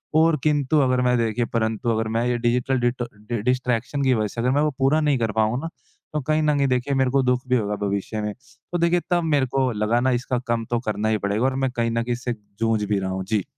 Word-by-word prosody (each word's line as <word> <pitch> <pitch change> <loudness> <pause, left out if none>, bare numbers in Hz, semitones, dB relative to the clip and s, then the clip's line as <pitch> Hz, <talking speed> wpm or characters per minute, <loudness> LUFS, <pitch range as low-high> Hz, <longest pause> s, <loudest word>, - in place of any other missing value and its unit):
और 160 0 +4
किंतु 150 0 +2
अगर 130 -1 +2
मैं 125 -1 +2
देखिए 115 +1 0
परंतु 110 0 0
अगर 110 0 0
मैं 120 - +1
ये 120 -1 +1
डिजिटल 125 +2 +1
डिटर 120 0 -1 0.2
डि 120 -3 -2
डिस्ट्रैक्शन 125 +2 0
की 130 - +3
वजह 110 -3 +1
से 115 - -5
अगर 125 +2 +2
मैं 145 +2 +2
वो 150 0 +2
पूरा 140 +4 +3
नहीं 145 -3 +2
कर 115 -2 0
पाऊँ 110 +4 +1
ना 165 - -4 0.4
तो 150 - -1
कहीं 155 +3 +1
न 150 -1 +2
कहीं 140 -1 +2
देखिए 125 +2 0
मेरे 130 -1 +2
को 135 0 +3
दुःख 125 0 +1
भी 125 - +2
होगा 105 -2 -1
भविष्य 100 +2 -2
में 105 0 -3
तो 130 +6 -8
देखिए 170 +1 +2
तब 175 -1 +2
मेरे 145 -4 +2
को 130 -2 +2
लगा 105 +2 +1
ना 130 0 +2
इसका 125 -1 -2
कम 115 -1 0
तो 120 - +2
करना 105 0 0
ही 110 - +2
पड़ेगा 100 +5 -1
और 135 0 +1
मैं 130 - -1
कहीं 115 -2 -1
न 115 0 0
कहीं 120 +1 -1
इससे 120 0 -3 0.3
जूझ 115 -2 +1
भी 105 -1 0
रहा 95 0 -3
हूँ। 95 0 -3
जी। 105 0 0
125 Hz, 265 wpm, -23 LUFS, 115-135 Hz, 0.4 s, और